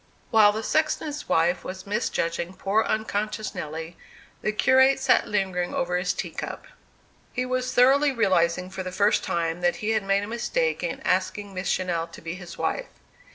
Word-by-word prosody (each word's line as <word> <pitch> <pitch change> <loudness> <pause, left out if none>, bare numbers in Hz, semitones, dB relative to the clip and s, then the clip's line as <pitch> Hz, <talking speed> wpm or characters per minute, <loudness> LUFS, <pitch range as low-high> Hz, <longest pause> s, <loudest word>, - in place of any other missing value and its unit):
While 215 -3 +7
the 220 +2 -4
sexton's 305 +1 -1
wife 170 +2 +2
was 185 0 -7
misjudging 180 -4 -2
poor 205 +4 +1
unconscious 215 0 -2
Nelly, 160 +2 -6 0.4
the 215 - 0
curate 260 +5 +4
sat 265 - +3
lingering 190 -3 -1
over 180 +1 0
his 180 0 +1
tea - - -4
cup. - - -6 0.7
He 255 - -1
was 255 0 -1
thoroughly 275 +4 +5
realizing, 180 -6 +1
for 190 - -5
the 185 0 -5
first 200 +3 +2
time, 165 0 -1
that 175 0 +2
he 215 +1 -2
had 220 -1 +2
made 195 0 +1
a - - -5
mistake 470 - -1
in - - -3
asking 205 -2 -1
Miss 185 0 -3
Channell 170 -3 -1
to - - -9
be 165 0 -5
his 180 -1 -9
wife. - - -2
200 Hz, 175 wpm, -25 LUFS, 180-230 Hz, 0.7 s, While